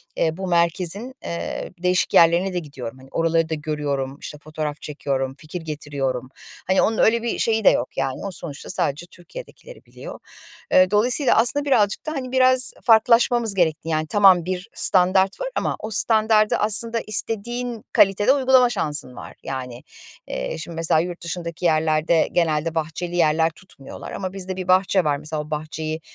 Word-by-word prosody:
eee, 160 +1 0
bu 190 -1 -4
merkezin, 180 +7 0
eee, 170 - -5
değişik 180 0 +1
yerlerine 170 +3 +4
de 180 - -1
gidiyorum. 130 -6 -8
Hani, 130 +1 -16
oraları 165 0 +1
da - - -2
görüyorum, 145 -3 -3
işte, 150 - -8
fotoğraf 155 -1 -5
çekiyorum, 135 -3 -3
fikir 160 +3 -8
getiriyorum. 140 -5 -4 0.4
Hani, 190 - +3
onun 220 - +1
öyle 230 +1 +3
bir 235 - -2
şeyi 220 -1 +1
de - - +8
yok, 120 - -2
yani. 135 +6 -3
O 195 - -4
sonuçta 155 -5 -8
sadece 145 +5 -2
Türkiye'dekileri - - -13
biliyor. - - -10 0.5
E, 185 +1 +5
dolayısıyla, 245 +6 +2
aslında, 285 +5 +3
birazcık 220 -5 +1
da, 310 - -3
hani, 260 -4 -5
biraz 255 0 +3
farklılaşmamız 230 -1 +4
gerekti. 165 -2 0
Yani, 155 0 -1
tamam, 190 -4 +5
bir 185 +4 -4
standart 190 +1 +2
var - - -2
ama - - -1
o 220 - -6
standardı, 215 0 +3
aslında, 225 +2 +2
istediğin 230 +2 -3
kalitede 205 +6 +4
uygulama 260 -2 +4
şansın 150 - -3
var. - - -10
Yani, 125 -2 -6 0.4
eee, 65 - -4
şimdi, 165 +1 -8
mesela, 160 -1 +3
yurt 175 +1 -4
dışındaki 170 0 -5
yerlerde 155 0 +2
genelde 165 -1 0
bahçeli 165 +2 -3
yerler 160 -1 +3
tutmuyorlar 160 -5 -12
ama 185 -1 -5
bizde 190 -1 -5
bir 185 -1 -6
bahçe 185 0 +3
var. 145 -2 0
Mesela, 150 +1 -4
o 150 - -11
bahçeyi 155 +1 -4
175 Hz, 165 wpm, -22 LUFS, 155-215 Hz, 0.5 s, de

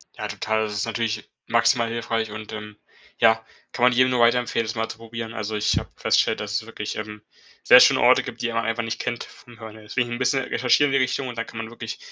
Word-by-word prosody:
Ja, - - -5
total. 110 +1 -1
Das 105 - -5
ist 105 +2 -1
natürlich 115 -1 -3 0.2
maximal 115 -1 +3
hilfreich 115 -1 -2
und, 110 0 -8
ähm, 105 -1 -8 0.4
ja, 115 -1 +4 0.3
kann 120 - -3
man 125 - +6
jedem 130 +1 +3
nur 125 - +1
weiterempfehlen, 120 -1 +2
das 110 - -4
mal 110 0 -2
zu - - -8
probieren. 115 0 -7
Also, 105 -1 -4
ich 105 0 +1
habe - - -3
festgestellt, - - +1
dass 105 0 -5
es 110 - -1
wirklich, 105 -2 -6
ähm, 105 0 -7 0.4
sehr - - +9
schöne - - +5
Orte - - +5
gibt, - - -8
die 120 - -1
man 115 0 -1
einfach 115 0 -1
nicht 115 0 -4
kennt 120 - -3
vom 120 -1 -16
Hören 110 -1 -9
her. 110 - -13
Deswegen 120 +3 -2
'n 120 - -5
bisschen 135 +1 +1
recherchieren 135 +3 +2
in 135 - +3
die - - +4
Richtung 130 +1 -2
und 120 -2 -7
da 115 - -1
kann 115 - -12
man 115 0 -5
wirklich 120 -1 -7
115 Hz, 255 wpm, -23 LUFS, 110-120 Hz, 0.4 s, sehr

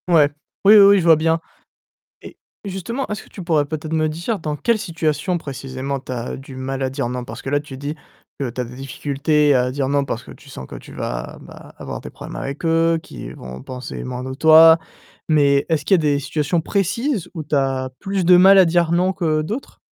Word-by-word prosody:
Ouais. 160 -5 +5 0.4
Oui, 210 +2 +9
oui, - - +9
oui, 200 0 +7
je - - -1
vois 165 -1 +7
bien. 160 +1 +1 0.8
Et - - -12 0.3
justement, 200 +7 -4
est-ce 210 -1 -4
que - - -18
tu 190 - -9
pourrais 160 -4 +2
peut-être 155 +1 -6
me 155 -1 +1
dire 170 +8 -3
dans 150 -2 -3
quelle 230 +8 +1
situation 170 -2 -1
précisément, 135 -1 -5
tu 130 - -11
as 120 -1 -4
du 135 0 -11
mal 135 +1 -4
à 130 - 0
dire 135 -2 -3
«non»? 125 0 -4
Parce - - -9
que 135 - -5
là, 145 0 +2
tu 145 -2 -10
dis 145 +3 -5 0.5
que 135 -3 -2
tu 125 - -5
as - - -1
des 120 +1 -10
difficultés 140 +2 +1
à 125 0 +2
dire 135 0 -2
«non» 140 0 +1
parce 120 -3 -4
que - - -11
tu - - -17
sens 65 - -9
que - - -11
tu - - -13
vas - - -5
vas - - -13
avoir - - -6
des - - -9
problèmes - - -9
avec 140 +4 -6
eux, 165 0 +2
qu'ils - - -9
vont 65 +1 -9
penser 130 0 -7
moins 125 0 -5
de 130 0 -5
toi, 160 +3 +7 0.5
mais 140 -3 +3
est-ce 160 -3 0
qu'il 195 - +3
y 180 - +4
a - - -4
des 145 -2 +2
situations 150 +3 -1
précises 200 - -1
où 160 - -4
tu 150 - -3
as 135 -2 0
plus 195 -2 -2
de 180 +1 +7
mal 190 +2 +7
à 190 - +8
dire 170 -1 +2
«non» 180 +2 +2
que 160 -5 0
d'autres? 220 - -6
155 Hz, 235 wpm, -20 LUFS, 135-175 Hz, 0.8 s, Oui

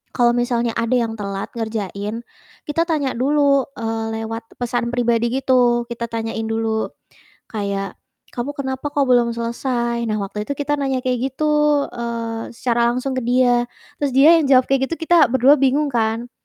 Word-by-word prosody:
kalau 240 -1 +4
misalnya 240 -1 0
ada 230 +2 0
yang 230 -2 0
telat 200 -1 -4
ngerjain, 220 0 -4 0.4
kita 315 +3 +1
tanya 295 -5 0
dulu, 275 +1 +2
eee, 225 0 -3
lewat 225 +1 -7
pesan 240 -1 -1
pribadi 235 -1 +1
gitu, 245 -2 +3
kita 235 0 -4
tanyain 225 -1 -3
dulu 225 0 -1 0.6
kayak, 200 -3 -3 0.4
"Kamu 250 +4 -3
kenapa 265 0 -4
kok 285 0 0
belum 240 -2 +3
selesai?" 235 0 -2
Nah, 215 - 0
waktu 210 +2 -5
itu 280 - -1
kita 290 0 0
nanya 265 -2 -1
kayak 255 +1 -1
gitu, 300 -1 +2
eee, 230 -1 -5
secara 235 0 +1
langsung 260 +2 -2
ke - - -2
dia. 245 -1 +3 0.3
Terus 285 -2 -1
dia 310 +5 +7
yang 310 - +1
jawab 255 -2 +6
kayak 270 0 +2
gitu, - - 0
kita 335 +1 +5
ber-2 260 +2 +5
bingung 280 +2 +2
kan, 230 0 -1
240 Hz, 165 wpm, -20 LUFS, 225-270 Hz, 0.6 s, dia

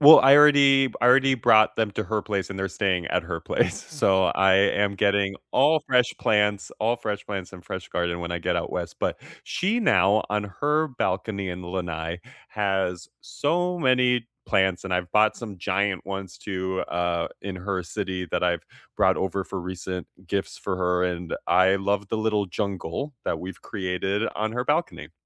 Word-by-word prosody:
Well, 150 +2 +10
I 135 +1 +7
already 140 -2 +6
b - - -14
I 120 - +5
already 135 +1 +5
brought 110 -2 +4
them 110 -2 0
to 110 - -3
her 110 -2 -2
place, 100 -3 -2
and 100 - -7
they're 95 0 -1
staying 95 -3 -1
at - - 0
her - - -4
place, - - -1
so 95 -1 +2
I 95 -1 +4
am 100 +1 +2
getting 100 -1 +1 0.2
all 150 +4 +4
fresh 125 -2 +2
plants, 105 -1 +1
all 115 +3 +1
fresh 105 -3 -4
plants 95 -3 -5
and 90 -2 -11
fresh 95 -1 -6
garden 85 0 -2
when 85 0 -4
I 85 - -2
get 85 - -1
out - - -3
west, - - -4
but - - -2 0.2
she 210 +6 0
now, 105 - +3
on 105 0 0 0.2
her 150 +2 +2
balcony 100 -5 -2
in 90 +1 -6
Lenai, 85 -2 -4 0.3
has 95 -4 -2
so 175 +4 -1
many 125 -4 +2 0.2
plants, 95 -1 +1
and 95 - -2
I've 90 -1 -3
bought 110 0 +4
some 105 -5 -8
giant 100 +1 -1
ones 95 -1 -6
too, 95 -2 -3
uh, 85 -1 -1
in 95 -1 -5
her 95 0 -3
city 90 +2 -4
that - - -1
I've 85 -2 +1 0.3
brought - - +3
over 95 0 -2
for 95 - -5
recent 90 0 -6 0.2
gifts 100 +2 -3
for 95 -2 -3
her, 90 0 +1
and 90 -1 -3
I 95 +1 +4
love 100 +1 -1
the 110 - -1
little 105 -2 0
jungle 100 - -4
that - - -1
we've 95 0 -8
created 95 +1 -2
on 110 +1 -2
her 125 +1 -2
balcony. 155 +5 -1
100 Hz, 190 wpm, -25 LUFS, 90-110 Hz, 0.3 s, Well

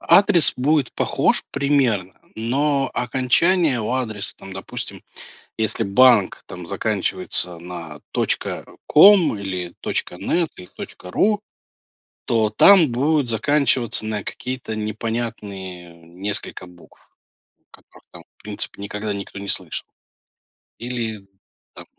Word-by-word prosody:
Адрес 175 -3 +5
будет 140 0 +1
похож - - +1
примерно, 125 -10 +1 0.2
но 135 +4 0
окончание 135 +3 +2
у 110 - -3
адреса 110 -6 -3
там, 95 - -11
допустим, 95 0 -7 0.6
если 110 0 0
банк 110 0 +4
там 90 -1 -8
заканчивается 90 -1 -1
на 85 -4 -8 0.9
.com 175 - +6
или 90 -3 -4 0.4
.net, 170 - 0
или 90 -1 -11 0.4
.ru, 210 - +1 0.9
то 110 -2 +1
там 165 - +6
будет 140 +2 +1
заканчиваться 125 -2 +1
на 105 -2 -3
какие-то 125 -3 -5
непонятные 105 -5 -5
несколько 90 +3 -6
букв, 85 -2 -19 0.6
которых - - -19
там - - -13
в - - -24
принципе 105 -1 -3
никогда 105 +1 -4
никто 100 0 -7
не 100 0 -7
слышал. 90 -4 -1 0.9
Или 115 -5 -4 0.5
там - - -11
110 Hz, 105 wpm, -21 LUFS, 95-135 Hz, 0.9 s, com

